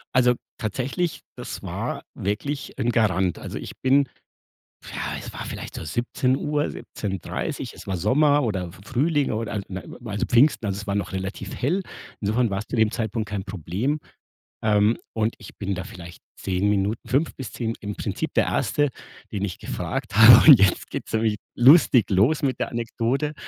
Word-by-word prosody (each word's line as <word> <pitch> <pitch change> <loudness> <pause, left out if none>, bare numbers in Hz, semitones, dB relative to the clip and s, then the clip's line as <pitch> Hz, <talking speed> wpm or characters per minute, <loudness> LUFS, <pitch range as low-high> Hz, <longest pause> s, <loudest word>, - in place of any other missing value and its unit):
Also, 125 -1 +5 0.2
tatsächlich, 130 +9 -2 0.2
das - - -7
war - - -4
wirklich 110 +9 -3
'n 120 -2 +1
Garant. 95 -6 +2
Also, - - -6
ich - - -7
bin 135 +1 +4 0.8
ja, - - -6 0.2
es - - -8
war - - -6
vielleicht - - -7
so - - -6
17:00, 130 - 0
17:30, 95 -4 -5
es - - -11
war 95 - -1
Sommer 145 - +3
oder 95 -6 -1
F 85 - -13
Frühling 145 +5 +1
oder 110 -1 -3
a - - -3
n 95 -1 -7
also, 105 -1 -1
Pfingsten, 125 0 +4
also, 100 -2 -1
es 105 +1 -7
war 100 - -1
noch 100 -1 -2
relativ 95 +1 -5
hell. 175 +10 0 0.4
Insofern 110 +3 +1
war's 100 +2 -3
zu - - -3
dem 110 -2 +3
Zeitpunkt 110 -2 -3
kein 100 -2 -4
Problem. 100 - -2 0.6
Ähm, 105 +1 +3 0.2
und 110 +1 0
ich 105 - -12
bin 100 -1 -2
da 90 - -4
vielleicht 85 -1 -11 0.2
10 95 +1 0
Minuten 105 +2 0
5 145 +5 +1
bis 130 - -7
10 115 -2 -2
im 105 -1 -5
Prinzip - - -3
der - - +4
1. 145 -1 +1 0.4
den 100 -2 -3
ich 90 - -5
gefragt - - -4
habe 110 +8 +9
und 135 - +9
jetzt 95 -2 +2
geht's - - -6
nämlich 110 -1 +1 0.2
lustig 130 - +6
los 115 - +3
mit 135 -2 0
der - - -1
Anekdote. 120 +5 -1
110 Hz, 175 wpm, -24 LUFS, 100-130 Hz, 0.8 s, habe